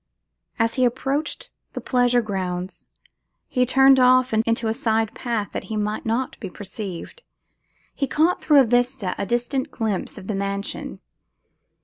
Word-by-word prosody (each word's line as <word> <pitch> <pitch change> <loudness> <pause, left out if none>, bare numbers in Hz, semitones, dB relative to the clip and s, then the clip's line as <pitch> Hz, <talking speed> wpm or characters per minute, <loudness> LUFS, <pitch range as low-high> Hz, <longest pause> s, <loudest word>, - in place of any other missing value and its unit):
As 230 -1 +1
he 255 - +1
approached 270 +5 -1 0.2
the - - -4
pleasure 245 -1 +2
grounds, 185 -3 -4 0.6
he 250 -1 +1
turned 270 +1 +6
off 255 -1 +5
into 230 +1 +1
a 220 - +1
side 225 -3 0
path 225 -6 -2
that - - -5
he 220 - -4
might 210 +1 -2
not 235 +4 -1
be 195 - -6
perceived; 195 - -7 0.7
he 275 - -1
caught, 320 +6 +2
through 295 -3 +6
a - - +3
vista, 245 -3 +1
a 200 - -2
distant 245 +4 -1
glimpse 215 -5 -3
of - - -9
the 215 - -3
mansion. 200 0 -4
230 Hz, 150 wpm, -23 LUFS, 205-255 Hz, 0.7 s, turned